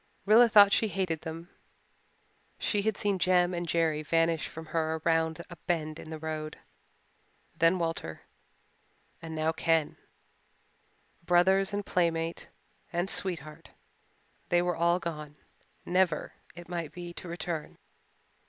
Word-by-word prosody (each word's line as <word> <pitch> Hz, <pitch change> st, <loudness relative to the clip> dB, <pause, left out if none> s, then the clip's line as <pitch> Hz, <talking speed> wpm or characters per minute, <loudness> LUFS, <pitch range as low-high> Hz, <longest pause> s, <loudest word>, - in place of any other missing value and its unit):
Rilla 230 Hz, +3 st, +7 dB
thought 205 Hz, -2 st, +8 dB
she 220 Hz, -, +3 dB
hated 185 Hz, -6 st, -2 dB
them. 165 Hz, +2 st, -8 dB, 1.1 s
She 205 Hz, -, 0 dB
had 215 Hz, 0 st, 0 dB
seen 200 Hz, -2 st, 0 dB
Jem 180 Hz, 0 st, +3 dB
and 175 Hz, 0 st, -3 dB
Jerry 160 Hz, -2 st, +1 dB
vanish 165 Hz, +1 st, +1 dB
from 160 Hz, 0 st, -9 dB
her 160 Hz, -1 st, 0 dB
around 165 Hz, 0 st, +1 dB
a 175 Hz, -, -11 dB
bend 155 Hz, -3 st, -1 dB
in -, -, -10 dB
the 160 Hz, -, -5 dB
road 155 Hz, 0 st, -5 dB, 1.0 s
then 165 Hz, +3 st, +4 dB
Walter 165 Hz, -, -3 dB, 1.0 s
and 160 Hz, -1 st, -7 dB
now 155 Hz, +1 st, +1 dB
Ken. 165 Hz, -1 st, +1 dB, 1.3 s
Brothers 190 Hz, +3 st, +3 dB
and 205 Hz, 0 st, -3 dB
playmate 165 Hz, -2 st, -1 dB, 0.4 s
and 175 Hz, +2 st, 0 dB
sweetheart 155 Hz, -5 st, -3 dB, 0.8 s
they 175 Hz, 0 st, +3 dB
were 175 Hz, -1 st, 0 dB
all 170 Hz, +1 st, +3 dB
gone, 150 Hz, -4 st, -6 dB, 0.5 s
never, 180 Hz, -3 st, +1 dB, 0.2 s
it 175 Hz, 0 st, -10 dB
might 170 Hz, -4 st, -4 dB
be, 175 Hz, +1 st, -8 dB
to 180 Hz, -, -8 dB
return. 170 Hz, -2 st, -5 dB
170 Hz, 130 wpm, -29 LUFS, 160-180 Hz, 1.3 s, thought